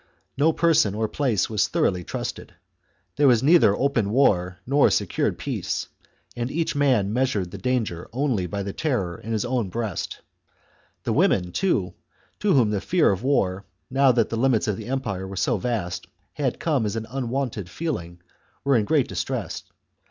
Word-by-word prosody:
No 150 +4 +3
person 160 - +3
or 110 0 0
place 120 -8 0
was 110 -3 +1
thoroughly 90 -1 0
trusted. - - -6 0.6
There 145 -1 +5
was 120 -2 +4
neither 145 - +5
open 130 -7 +1
war 90 -7 +2
nor 140 +3 +4
secured - - 0
peace, - - -3 0.5
and 120 +1 -2
each 160 +2 -1
man 125 -8 +2
measured 115 -8 0
the 100 - -7
danger 110 -7 -2
only 120 -7 0
by 100 +1 -3
the 100 0 -5
terror 100 - -1
in 115 - -7
his 110 +1 0
own 120 -5 -1
breast. 110 -2 -4 0.8
The - - 0
women, 90 -1 +2
too, 100 - 0 0.5
to 205 -2 +2
whom 120 -7 +4
the 100 -2 -1
fear 175 - +3
of 95 - -2
war, 100 -8 0 0.3
now 135 0 +5
that 120 -2 +2
the 115 - -2
limits 120 -2 +2
of 105 - 0
the - - -8
empire 110 -8 -3
were 95 - -7
so 100 +5 +1
vast, 100 -5 -3 0.3
had 135 -4 -2
come 140 -9 +1
as 105 - -3
an 110 0 -3
unwonted 125 -5 -3
feeling, 90 - -4 0.4
were 140 -1 +3
in 105 - +1
great 145 +1 +2
distress. - - -3
115 Hz, 175 wpm, -24 LUFS, 100-135 Hz, 0.8 s, There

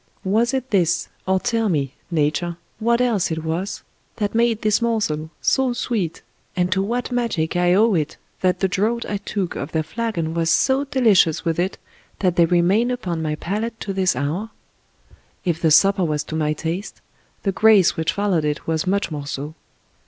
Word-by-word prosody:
Was 225 +6 +2
it 260 -2 -3
this, 175 -3 +1 0.2
or 190 0 +3
tell 225 +1 0
me, 140 -6 -1 0.2
Nature, 165 +1 0 0.2
what 235 +2 +2
else 225 -7 +1
it 160 -1 -3
was 170 +5 -3 0.3
that 205 -2 -2
made 230 -1 +1
this 215 +2 +2
morsel 205 -10 -1
so 265 -2 +2
sweet, 225 -9 -2 0.3
and 180 0 0
to 190 +1 +2
what 240 +6 -2
magic 230 -11 -1
I 175 0 +3
owe 220 +2 +4
it 155 -4 -1 0.2
that 185 -1 +1
the 190 - +3
draught 220 +5 0
I 205 - -2
took 200 -2 -3
of 145 +4 -5
their 160 -1 +1
flagon 170 -4 -3
was 165 -1 0
so 265 +10 +3
delicious 220 - +3
with 165 0 0
it 185 +2 -1 0.4
that 180 -3 +1
they 170 - +5
remain 180 +8 +3
upon 185 -10 -3
my 155 -1 -1
palate 215 +7 -3
to 195 - -3
this 185 -5 +1
hour? 155 - -2 1.0
If 170 -2 -1
the 160 - +3
supper 195 +5 +5
was 150 -3 0
to 155 - -6
my 155 -1 +1
taste, 170 +6 -4 0.4
the 195 - 0
gjace 215 -3 +5
which 160 0 -1
followed 200 -6 +1
it 150 0 -2
was 160 +1 -1
much 200 -2 0
more 145 -2 -5
so. 145 +2 -5
185 Hz, 185 wpm, -21 LUFS, 160-220 Hz, 1.0 s, they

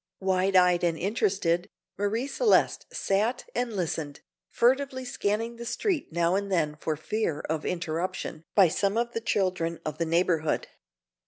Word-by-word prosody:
Wide 190 0 +1
eyed 180 -1 +5
and 170 -2 +1
interested, 185 -3 0 0.3
Marie 210 +5 -1
Celeste 420 - +2
sat 225 - 0
and 245 -1 -1
listened, 160 -5 -3 0.3
furtively 260 +1 +1
scanning 230 0 -2
the 235 - -7
street 350 - -1
now 170 +1 +2
and 200 +1 -1
then 155 -5 +1
for 155 +1 -2
fear 165 0 -2
of 155 -1 -3
interruption 165 -1 -3
by 195 -3 +7
some 200 +6 0
of 235 0 0
the 230 - -2
children 180 -6 0
of 155 0 -4
the 165 - +1
neighborhood. 165 -2 +1
190 Hz, 150 wpm, -27 LUFS, 165-230 Hz, 0.3 s, by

